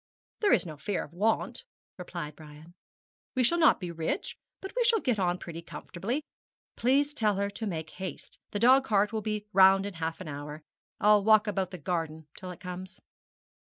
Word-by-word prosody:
'There 410 -2 +4
is - - +3
no 155 -3 -7
fear 190 +7 -2
of 150 - -13
want,' 220 - 0 0.3
replied 170 -5 -6
Brian. 155 +2 -13 0.6
'We 255 - +3
shall 340 +8 +3
not 315 - +5
be 180 -2 -5
rich, 165 - -3 0.2
but 385 - -8
we - - +3
shall 465 -1 +4
get 245 - 0
on 180 -1 +1
pretty 170 -1 -7
comfortably. 215 - -4 0.5
Please 280 +4 +2
tell 215 -7 +1
her 200 +1 -1
to 220 +2 -4
make 160 -4 -4
haste. 185 -4 -7
The - - -3
dog 255 +5 +6
cart 210 -3 +2
will 220 - -1
be 210 0 -3
round 195 0 +6
in 205 - -5
half 165 -1 -3
an 185 - -7
hour. 150 +1 -7 0.4
I'll 210 -1 +5
walk 215 0 +6
about 195 -3 -1
the 180 - -7
garden 160 -1 -3
till 185 - -8
it 180 - -8
comes.' 180 +1 -8
190 Hz, 190 wpm, -29 LUFS, 170-220 Hz, 0.6 s, dog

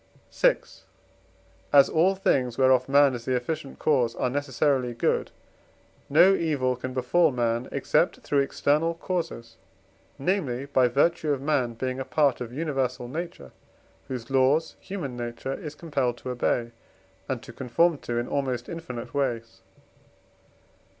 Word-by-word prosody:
VI. - - +4 1.1
As 140 -1 +7
all 180 +5 +3
things 130 -10 +1
whereof 130 -1 +3
man 140 -1 +5
is 120 -1 -6
the 130 - 0
efficient 135 +3 -4
cause 125 -6 +1
are 125 - -1
necessarily 135 -2 0
good, 115 - 0 0.8
no 175 +7 +6
evil 145 -8 0
can 130 +1 -6
befall 130 +7 +2
man 120 -1 -1
except - - +1
through 145 - +1
external 150 +4 +1
causes; 165 -11 -4 0.6
namely, 140 -5 -1
by 130 -3 +3
virtue 150 +5 +1
of 140 - 0
man 130 -4 0
being 130 +2 -3
a - - -2
part 140 -2 +1
of 120 -1 -5
universal 135 -4 -2
nature, 135 - -6 0.6
whose 125 -1 -6
laws 135 +5 +2
human 165 -11 -6
nature 120 +2 -4
is 150 +1 -7
compelled 140 -7 -1
to 125 - -6
obey, 120 -1 -1 0.6
and 130 -3 -3
to 120 - -11
conform 140 +7 +1
to 120 - -4
in 120 - -1
almost 130 -4 -2
infinite 145 -8 -7
ways. 115 -8 -2
135 Hz, 140 wpm, -26 LUFS, 125-150 Hz, 1.1 s, As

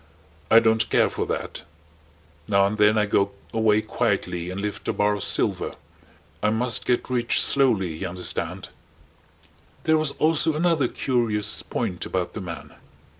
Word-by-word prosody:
I 115 - +7
don't 110 -1 +3
care - - +3
for - - -3
that. - - -4 0.9
Now 100 -2 +3
and 105 +2 -2
then 105 +1 +4
I 105 - +3
go 100 -1 +1 0.2
away 110 -1 +2
quietly 90 -1 -2
and 95 +1 -5
lift 105 0 -5
a - - 0
bar 105 0 +1
of 105 - -4
silver. - - 0 0.7
I 105 - +2
must 115 +2 0
get 125 - +1
rich 120 -2 +1
slowly 105 - +3
you 95 - -4
understand." 90 0 -3 1.1
There 160 0 +3
was 155 -2 0
also 160 0 +2
another 165 -2 +2
curious 115 -5 -1
point 90 - -4
about 90 -1 -3
the 110 - -6
man. 85 -3 -8
105 Hz, 155 wpm, -24 LUFS, 100-125 Hz, 1.1 s, I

